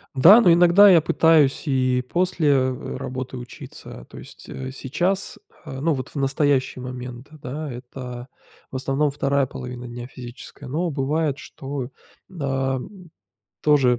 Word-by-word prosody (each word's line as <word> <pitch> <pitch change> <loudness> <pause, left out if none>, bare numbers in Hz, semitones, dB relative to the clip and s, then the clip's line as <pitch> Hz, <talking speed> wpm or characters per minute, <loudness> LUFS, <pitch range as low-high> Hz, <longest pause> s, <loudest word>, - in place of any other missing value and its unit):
Да, 185 - +8
но 180 - +6
иногда 175 +4 +7
я 175 -4 +7
пытаюсь 155 -3 +3
и 130 -2 +1
после, 180 -3 0
э, 130 -2 0
работы 130 0 -5
учиться, 120 - -10
то - - -12
есть, - - -12
э, 130 0 -6
сейчас, 175 +9 -2 0.3
э, 135 -4 -7
ну 160 +2 +1
вот 130 -1 -5
в - - -20
настоящие 135 -2 +1
момент, 125 0 -7
да, 150 0 -6
это 125 0 -8 0.4
в - - -9
основном 135 +2 0
2 140 -1 +1
половина 125 -2 -8
дня 120 0 -7
физическая, 125 0 -11
но 165 +6 -1
бывает 150 0 -1
что, 135 -3 -7 0.5
а, 135 -1 -1 0.8
тоже 135 -5 +4
135 Hz, 140 wpm, -23 LUFS, 130-150 Hz, 0.8 s, Да